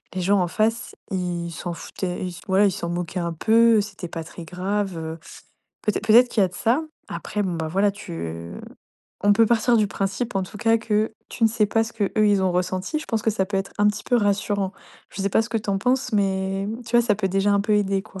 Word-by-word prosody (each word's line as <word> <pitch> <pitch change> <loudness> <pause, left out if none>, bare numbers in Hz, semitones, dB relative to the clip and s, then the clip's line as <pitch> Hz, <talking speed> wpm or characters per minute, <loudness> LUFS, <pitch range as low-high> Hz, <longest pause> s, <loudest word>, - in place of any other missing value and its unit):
les 185 - -1
gens 195 +2 +3
en 175 - +1
face, 225 +5 0 0.2
ils 175 -2 -2
s'en 170 +1 -5
foutaient, 180 +1 -5
ils 175 -1 -8
ouais, 200 +2 +5
ils - - +1
s'en 170 -1 -4
moquaient 175 +1 -3
un 170 -1 -2
peu, 225 +5 +4
c'était 195 -3 -7
pas 165 -1 -5
très 170 +1 -10
grave, 190 +1 -2
heu. 160 +1 -6 0.6
Peut-ê 210 - 0
peut-être 230 +3 +6
qu'il 220 -4 +2
y - - +6
a 185 - 0
de 180 - -16
ça. 245 +8 +1 0.3
Après, 210 - -3
bon, 185 - -1
bah, 160 -1 -3
voilà, 195 +4 +2
tu 85 - -7 0.7
on 205 - +6
peut 225 +2 +5
partir 235 +1 +3
du 210 - +3
principe 195 +3 -2
en 190 - +1
tout 195 +3 -8
cas 225 +1 +3
que 220 0 0 0.2
tu 235 - -7
ne 225 - +6
sais 215 -1 +2
pas 225 +2 +2
ce 230 - -8
qu'eux, 205 -3 0
ils 205 -2 +4
ont 185 - +2
ressenti. 185 - -1
Je 310 - -9
pense 220 -2 -1
que 220 - +2
ça 195 -3 0
peut 195 0 -2
être 195 - -4
un 205 - +4
petit 210 +1 -3
peu - - 0
rassurant. 200 -2 0 0.4
Je 195 - -5
sais 200 - 0
pas - - +4
ce 230 - -7
que 230 - 0
tu 210 -1 -4
en 195 - +1
penses, 255 +4 0
mais 195 -1 0 0.2
tu 235 - +2
vois, 240 - +6
ça 210 - +3
peut 210 - 0
déjà 195 +2 +1
un 200 - +3
peu 210 +1 0
aider, 195 -1 +1
quoi? 195 -2 -11
200 Hz, 255 wpm, -23 LUFS, 185-220 Hz, 0.7 s, peut-être